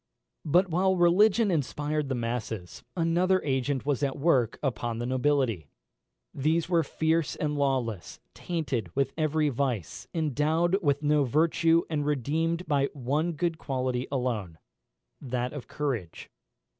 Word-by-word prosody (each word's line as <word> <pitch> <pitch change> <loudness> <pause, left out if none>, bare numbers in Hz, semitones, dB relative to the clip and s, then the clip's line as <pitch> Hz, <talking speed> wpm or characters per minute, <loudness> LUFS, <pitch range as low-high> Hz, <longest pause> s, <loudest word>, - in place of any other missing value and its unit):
But 175 +5 +4
while 190 +3 +2
religion 200 +5 +4
inspired 150 -1 -1
the 130 - 0
masses, 115 -6 -4
another 175 +3 +2
agent 135 -1 -1
was 145 -2 0
at 140 -1 -1
work 135 -7 +2
upon 120 -4 -2
the 120 - -3
nobility. 130 - 0 0.7
These 160 +4 +1
were 170 -2 +3
fierce 160 +1 0
and 150 -1 -2
lawless; 130 -9 -1
tainted 140 - -3
with 135 -1 0
every 155 -1 +1
vice, 125 - -3
endowed 160 +4 +1
with 145 -3 +1
no 150 0 +3
virtue, 165 +4 +3
and 150 -2 -1
redeemed 160 +5 -1
by 140 -2 +2
one 145 +5 -1
good 165 +1 -2
quality 130 -2 -2
alone, 115 - -2 0.6
that 125 -1 -3
of 145 -4 -7
courage. 120 - -4
145 Hz, 130 wpm, -28 LUFS, 125-165 Hz, 0.7 s, But